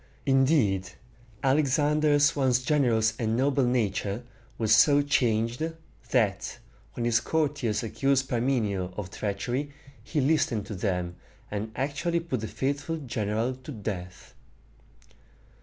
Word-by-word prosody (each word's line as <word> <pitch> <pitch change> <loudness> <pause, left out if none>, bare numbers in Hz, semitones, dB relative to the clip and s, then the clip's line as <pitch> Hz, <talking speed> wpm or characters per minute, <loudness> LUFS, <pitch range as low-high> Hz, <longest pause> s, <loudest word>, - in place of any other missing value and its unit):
Indeed, 130 - +2 0.5
Alexander's 145 +1 +3
once 130 -3 +2
generous 120 -6 +2
and 110 0 0
noble 135 0 +2
nature 110 -2 0 0.3
was 110 -2 +3
so 145 +5 +5
changed, 120 -3 +1 0.5
that, 105 -7 0 0.4
when 120 - -3
his 120 -1 +3
courtiers 145 -9 -1
accused 135 +4 +1
Parmenio 110 -7 -1
of 95 -3 -5
treachery, 120 +8 -3 0.3
he 150 - -2
listened 130 -7 +1
to 100 - -6
them, 90 -3 -2 0.3
and 105 +2 -3
actually 145 +5 -1
put 165 -7 -3
the 110 - -4
faithful 145 +6 -2
general 115 -3 -2
to 130 +3 -10
death. 95 -6 -6
125 Hz, 115 wpm, -27 LUFS, 105-140 Hz, 0.5 s, so